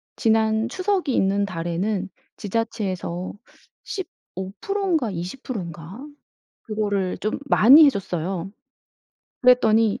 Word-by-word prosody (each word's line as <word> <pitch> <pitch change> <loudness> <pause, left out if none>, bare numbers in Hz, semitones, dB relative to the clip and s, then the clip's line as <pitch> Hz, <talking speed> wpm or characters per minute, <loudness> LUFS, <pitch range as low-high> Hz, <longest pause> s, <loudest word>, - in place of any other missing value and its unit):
지난 220 0 +2
추석이 370 -6 0
있는 200 +1 +2
달에는 185 +3 -2 0.3
지자체에서 195 -5 -3 0.5
15% 380 - -5
인가 280 - +1
20% 195 +6 -5
인가? 170 +5 -9 0.6
그거를 205 -4 -2
좀 215 - -2
많이 280 +8 +8
해줬어요. 190 - -1 0.9
그랬더니 225 -4 +4
210 Hz, 200 characters per minute, -23 LUFS, 185-235 Hz, 0.9 s, 많이